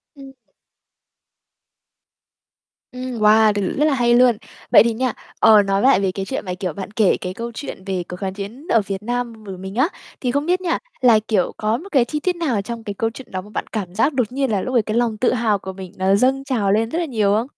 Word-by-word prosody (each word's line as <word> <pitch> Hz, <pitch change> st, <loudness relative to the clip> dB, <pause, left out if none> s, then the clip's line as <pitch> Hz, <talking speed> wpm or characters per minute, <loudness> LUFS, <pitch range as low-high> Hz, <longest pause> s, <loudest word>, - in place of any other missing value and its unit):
Ừm. 275 Hz, -1 st, -12 dB, 2.6 s
Ừm, 250 Hz, -1 st, -6 dB
wow, 215 Hz, 0 st, +5 dB
t 205 Hz, -2 st, -2 dB
rất 295 Hz, -, +3 dB
là 305 Hz, -, +3 dB
hay 240 Hz, -2 st, +2 dB
luôn. 245 Hz, -2 st, +5 dB, 0.3 s
Vậy 205 Hz, -, +8 dB
thì 230 Hz, 0 st, 0 dB
nha, 250 Hz, +1 st, -1 dB, 0.3 s
ờ, 215 Hz, -2 st, +7 dB
nói 195 Hz, 0 st, 0 dB
lại 265 Hz, -4 st, +5 dB
về 195 Hz, -1 st, 0 dB
cái 190 Hz, +1 st, -4 dB
chuyện 265 Hz, 0 st, -4 dB
mà, 180 Hz, -, -3 dB
kiểu, 180 Hz, -2 st, -4 dB
bạn 190 Hz, +4 st, -7 dB
kể 215 Hz, -3 st, +2 dB
cái 180 Hz, -, -4 dB
câu 235 Hz, +4 st, -6 dB
chuyện 225 Hz, -5 st, -7 dB
về 190 Hz, -2 st, -2 dB
cuộc 180 Hz, -, -5 dB
kháng 190 Hz, 0 st, -4 dB
chiến 210 Hz, -, -8 dB
ở 225 Hz, -, +4 dB
Việt 195 Hz, 0 st, -5 dB
Nam 240 Hz, -1 st, -3 dB
v 205 Hz, -, -11 dB
mình 190 Hz, +1 st, -7 dB
á, 260 Hz, +6 st, +3 dB, 0.3 s
thì 250 Hz, -, 0 dB
không 285 Hz, +3 st, 0 dB
biết 360 Hz, +2 st, +1 dB
nha 345 Hz, -2 st, 0 dB, 0.2 s
là, 235 Hz, -4 st, +6 dB
kiểu, 205 Hz, -5 st, +1 dB
có 215 Hz, +2 st, 0 dB
một 370 Hz, +10 st, -10 dB
cái 260 Hz, -5 st, +4 dB
chi 300 Hz, +4 st, -3 dB
tiết 360 Hz, +4 st, -1 dB
nào 285 Hz, -12 st, -1 dB
trong 230 Hz, +2 st, -6 dB
cái 205 Hz, -, -5 dB
câu 225 Hz, +3 st, -1 dB
chuyện 260 Hz, +1 st, -11 dB
đó 185 Hz, -, -3 dB
mà 205 Hz, -, -14 dB
bạn -, -, -4 dB
cảm 190 Hz, -5 st, -4 dB
giác 270 Hz, +8 st, +2 dB
đột 250 Hz, -4 st, 0 dB
nhiên 270 Hz, -1 st, -1 dB
là 200 Hz, -3 st, +1 dB
lúc 255 Hz, -, -4 dB
đấy 240 Hz, -, +4 dB
cái 215 Hz, +1 st, -1 dB
lòng 235 Hz, -2 st, +1 dB
tự 250 Hz, -, +2 dB
hào 225 Hz, -4 st, +1 dB
của 190 Hz, 0 st, -7 dB
mình 190 Hz, -1 st, -9 dB
nó 190 Hz, +1 st, +3 dB
dâng 265 Hz, +5 st, +2 dB
trào 230 Hz, -8 st, 0 dB
lên 225 Hz, +2 st, +1 dB
rất 325 Hz, -, -2 dB
là 345 Hz, -, 0 dB
nhiều 215 Hz, -8 st, +1 dB
không? 225 Hz, +4 st, 0 dB
225 Hz, 255 wpm, -20 LUFS, 200-255 Hz, 2.6 s, Vậy